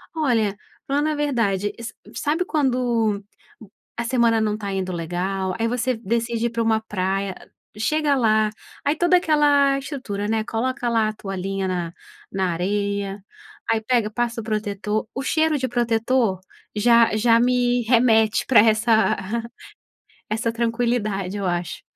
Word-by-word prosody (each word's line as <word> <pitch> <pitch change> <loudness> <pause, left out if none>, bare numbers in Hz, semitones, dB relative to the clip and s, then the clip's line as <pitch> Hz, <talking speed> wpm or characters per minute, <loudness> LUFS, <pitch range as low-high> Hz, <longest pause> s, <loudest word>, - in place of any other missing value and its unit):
olha, 225 -10 +1 0.3
falando 290 +3 +1
a 305 - -1
verdade 230 -9 0
sa 230 0 -6 0.2
sabe 320 +5 0
quando 245 - 0 0.7
a 235 - -1
semana 235 -2 +2
não 210 -1 0
está 205 -2 -5
indo 190 -1 -2
legal, 185 +3 -2
aí 230 - +1
você 250 +2 0
decide 230 +1 -1
ir - - -3
pra 230 0 -1
uma 220 -1 +2
praia, 195 -2 -2 0.4
chega 300 +5 +1
lá 215 -4 +3 0.4
aí 290 +2 +2
toda 350 +2 +4
aquela 290 -4 +3
estrutura, 255 -8 -5
né, 220 0 0
coloca 240 +2 -2
lá 225 -2 +2
a - - -5
toalhinha 195 -1 -4
na 175 -2 -3 0.4
na 190 -2 0
areia 200 +2 -2 0.5
aí 225 - +2
pega 225 -2 +1
passa 235 +1 -2
o - - -10
protetor 210 0 -2
o 265 - -2
cheiro 315 +1 +2
de 260 -1 -1
protetor 235 -3 +1 0.3
já 230 +1 +4
já 230 +1 +4
me 245 0 +2
remete 225 -2 +3
pra 255 - +6
essa 220 0 +3 1.1
essa 225 +1 -1
tranquilidade 230 -4 -1
eu 200 - -2
acho. 175 -1 -3
225 Hz, 145 wpm, -22 LUFS, 205-245 Hz, 1.1 s, pra